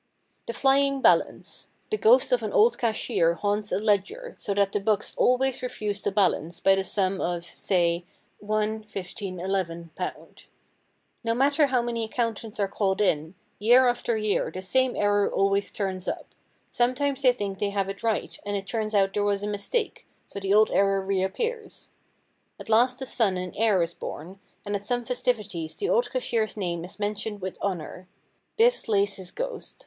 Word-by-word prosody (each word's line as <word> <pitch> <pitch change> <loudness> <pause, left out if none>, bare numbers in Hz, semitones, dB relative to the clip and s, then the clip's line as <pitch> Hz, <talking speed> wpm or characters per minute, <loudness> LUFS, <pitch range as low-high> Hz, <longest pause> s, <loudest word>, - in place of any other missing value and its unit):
The 235 - -3
Flying 275 +2 +3
Balance. - - +1 0.2
The 430 - +1
ghost 485 +3 +5
of - - +3
an - - -3
old 465 -1 +4
cashier 195 -7 +1
haunts 205 +2 -1
a - - +1
ledger, 215 - 0
so 200 - -3
that 200 -1 +2
the 205 - 0
books 205 0 0
always 260 +1 +2
refuse 210 -5 -3
to - - 0
balance 185 -4 +1
by 195 - +5
the 195 0 +1
sum 190 -1 0
of, 175 -1 -2
say, 175 -1 0 0.4
£1.15.11. 190 -5 -4 0.8
No 230 0 0
matter 280 +3 +3
how 255 -3 +1
many 235 -1 -2
accountants 225 -1 -3
are 200 - +2
called 195 -1 -1
in, 160 -4 +1 0.2
year 245 +5 +6
after 240 -1 0
year 215 -1 0
the 185 - -7
same 260 +6 +1
error 205 0 +2
always 195 +1 +1
turns 190 -2 -4
up; - - -3 0.5
sometimes 270 +3 0
they 255 -2 +6
think 200 -5 -4
they 205 - 0
have 200 -1 -1
it 195 0 -6
right 225 -2 -1
and 205 0 -2
it 195 - -6
turns 215 0 -2
out 195 -1 +3
there 205 - 0
was 205 0 0
a - - -2
mistake, 210 - -2 0.2
so - - -7
the 195 0 -2
old 215 +1 +5
error 195 0 +3
reappears. 195 - -3 0.7
At - - -10
last 250 +4 +3
a - - -4
son 220 -7 +1
and 180 0 -5
heir 210 -5 +3
is 170 0 -4
born, 180 +5 -8 0.3
and 205 0 -2
at 200 - -4
some 245 +3 -2
festivities 210 -10 -2
the 405 - -2
old 485 - +2
cashier's 230 - -1
name 170 -4 -2
is 180 - -10
mentioned 210 0 -3
with 190 -1 -5
honour. 180 -1 -4 0.5
This 485 +2 +3
lays 200 -1 +2
his 185 -2 -8
ghost. - - -6
205 Hz, 175 wpm, -26 LUFS, 195-245 Hz, 0.8 s, year